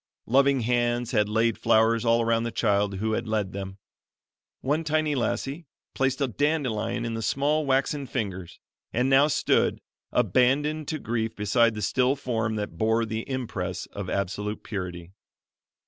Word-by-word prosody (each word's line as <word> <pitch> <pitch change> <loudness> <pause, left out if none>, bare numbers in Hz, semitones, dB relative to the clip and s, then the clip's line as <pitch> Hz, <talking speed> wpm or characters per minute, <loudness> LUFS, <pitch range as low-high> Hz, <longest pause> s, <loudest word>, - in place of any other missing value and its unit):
Loving 135 +2 +3
hands 120 0 0
had 105 -3 +2
laid 115 +1 +1
flowers 110 +1 +3
all 115 0 +3
around 115 0 +2
the 115 0 -2
child 100 -3 +1
who 110 +3 -1
had 115 +1 -2
led 105 -3 -1
them. 95 -1 -6 0.8
One 150 +5 0
tiny 155 -1 +1
lassie 135 +5 -2 0.3
placed 135 0 0
a 140 - +2
dandelion 120 -4 -1
in 115 - -3
the 115 - -3
small 145 +6 +1
waxen 135 +1 +1
fingers 95 -8 -4 0.3
and 125 +3 +1
now 135 +2 +6
stood, 150 - +1 0.3
abandoned 135 - +2
to 155 - -2
grief 115 -4 -2
beside 110 +2 +2
the 105 - -4
still 130 +1 +2
form 115 -5 -2
that 105 -6 -5
bore 110 +1 +2
the 110 +2 -5
impress 95 -9 -3
of 100 -2 -5
absolute 100 +2 -3
purity. 90 -4 -6
115 Hz, 155 wpm, -26 LUFS, 105-135 Hz, 0.8 s, now